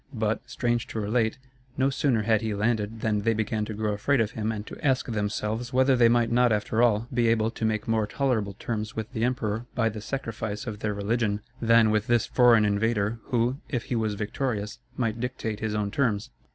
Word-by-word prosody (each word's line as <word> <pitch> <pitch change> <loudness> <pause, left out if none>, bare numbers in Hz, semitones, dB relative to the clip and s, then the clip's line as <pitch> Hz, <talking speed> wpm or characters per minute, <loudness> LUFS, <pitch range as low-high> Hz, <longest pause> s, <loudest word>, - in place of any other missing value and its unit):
But, 110 -1 0
strange 120 -1 -1
to 110 - -4
relate, 110 +3 0 0.4
no 135 +1 +2
sooner 130 -5 +1
had 110 -1 +2
he 110 -2 -2
landed 110 0 -1
than 105 -2 +1
they 115 +2 +1
began 110 0 -1
to 110 - -5
grow 105 0 -1
afraid 125 +7 +1
of 110 -2 +1
him 110 0 -2
and 105 -1 -5
to - - -10
ask 135 -3 +2
themselves 110 +2 -2
whether 130 +1 +4
they 120 -2 +5
might 120 -1 +2
not 120 0 +4
after 110 +2 +1
all, 115 -1 +3
be 120 -1 +2
able 115 -1 +2
to 115 - -3
make 110 -1 -1
more 110 -2 +1
tolerable 115 -8 0
terms 110 -2 -4
with 110 +3 -5
the 115 -3 -1
emperor 120 -2 -1
by 115 -2 +2
the 110 -1 -7
sacrifice 110 -4 -4
of 110 -3 -5
their 105 -1 -2
religion, 105 0 0 0.2
than 115 -1 +5
with 110 0 +1
this 120 -2 +3
foreign 120 -4 +5
invader, 105 +1 0
who, 120 0 0
if 125 -5 -2
he 125 - -3
was 110 -2 0
victorious, 105 0 -3 0.2
might 115 -2 -1
dictate 115 -3 -3
his 110 -1 -2
own 105 -1 -1
terms. 115 -1 0
110 Hz, 210 wpm, -26 LUFS, 105-120 Hz, 0.4 s, they